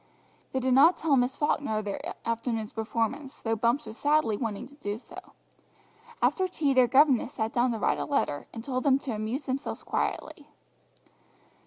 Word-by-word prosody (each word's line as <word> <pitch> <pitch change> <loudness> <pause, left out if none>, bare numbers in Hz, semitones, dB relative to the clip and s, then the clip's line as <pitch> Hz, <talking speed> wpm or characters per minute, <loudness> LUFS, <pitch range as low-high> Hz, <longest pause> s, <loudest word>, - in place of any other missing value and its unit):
They 265 - 0
did 260 0 +1
not 305 +7 +6
tell 305 -4 +2
Miss 250 0 +1
Falkner 290 -6 0
of 215 - -3
their 200 - -4
afternoon's 230 -1 -2
performance, 230 +5 -2
though 225 0 -1
Bumps 235 +6 +1
was 220 - -9
sadly 290 -7 +2
wanting 225 +1 -4
to - - -18
do 205 -8 -4
so. 230 - -13 0.9
After 375 -1 +2
tea 300 -6 0
their 255 -2 +5
governess 270 0 +4
sat 220 0 -2
down 245 +1 +2
to 230 - -2
write - - +1
a - - -2
letter, 275 - -1
and 225 - -8
told 255 0 -2
them 270 -2 +4
to 275 -2 -5
amuse 220 +7 -3
themselves 265 +1 -3
quietly. - - -3
250 Hz, 180 wpm, -28 LUFS, 225-280 Hz, 0.9 s, not